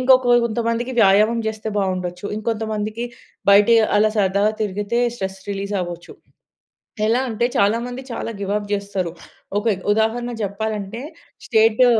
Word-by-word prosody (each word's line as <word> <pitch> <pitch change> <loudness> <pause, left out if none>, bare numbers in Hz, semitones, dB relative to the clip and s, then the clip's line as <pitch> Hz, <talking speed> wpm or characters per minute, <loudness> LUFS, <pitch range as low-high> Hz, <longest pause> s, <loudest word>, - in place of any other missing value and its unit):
ఇంకొక 255 -1 +5
కొంతమందికి 235 +2 -1
వ్యాయామం 215 +3 +5
జేస్తే 220 0 -5
బావుండొచ్చు. 185 0 -2
ఇంకొంతమందికి 220 0 -2 0.5
బయట 200 +2 +6 0.3
అలా 215 0 +4
సరదాగా 200 +2 +2
తిరిగితే 205 +3 -1 0.2
స్ట్రెస్ 190 -1 -5
రిలీజ్ 200 +1 -3
అవ్వొచ్చు. 175 -1 -8 0.9
ఎలా 230 +3 +3
అంటే 230 +1 0
చాలా 205 +3 +3
మంది 245 +1 -6
చాలా 230 0 -4
గివ్ 200 -1 -3
అప్ 205 -1 -3
జేస్తరు. 200 -4 -2 0.5
ఒక 205 - -2
ఎ - - -3 0.2
ఉదాహరణ 225 +3 0
చెప్పాలంటే 210 +2 -3 0.4
స్టేటు 225 +1 +4
215 Hz, 130 wpm, -21 LUFS, 200-230 Hz, 0.9 s, బయట